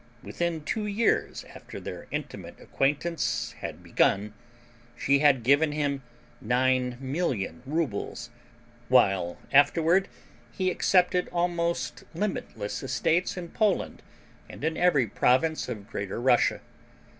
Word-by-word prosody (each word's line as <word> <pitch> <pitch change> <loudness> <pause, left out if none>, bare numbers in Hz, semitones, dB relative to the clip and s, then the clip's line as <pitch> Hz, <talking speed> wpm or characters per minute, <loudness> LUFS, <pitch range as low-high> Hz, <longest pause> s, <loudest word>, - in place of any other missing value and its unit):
Within 170 -3 -3
two 210 +6 -2
years 210 +3 0
after - - -10
their - - -8
intimate - - -6
acquaintance 150 +5 -1
had - - -7
begun 105 +2 +1 0.6
she 140 +1 +2
had 140 -4 +4
given 145 +4 +3
him 145 -2 -1 0.4
nine 125 0 +1
million 130 - -2
rubles, 150 -8 -3 0.6
while 90 -3 +3 0.2
afterward 165 +6 +4 0.4
he 185 -1 0
accepted 180 0 +2
almost 170 -1 -1
limitless 160 - -3
estates 155 +9 0
in 175 -2 -6
Poland 210 0 0 0.5
and - - -10
in 160 +1 0
every 165 -8 +3
province 130 +8 +1
of 105 -4 -6
Greater 100 -2 -4
Russia. 120 0 +3
145 Hz, 110 wpm, -27 LUFS, 125-175 Hz, 0.6 s, had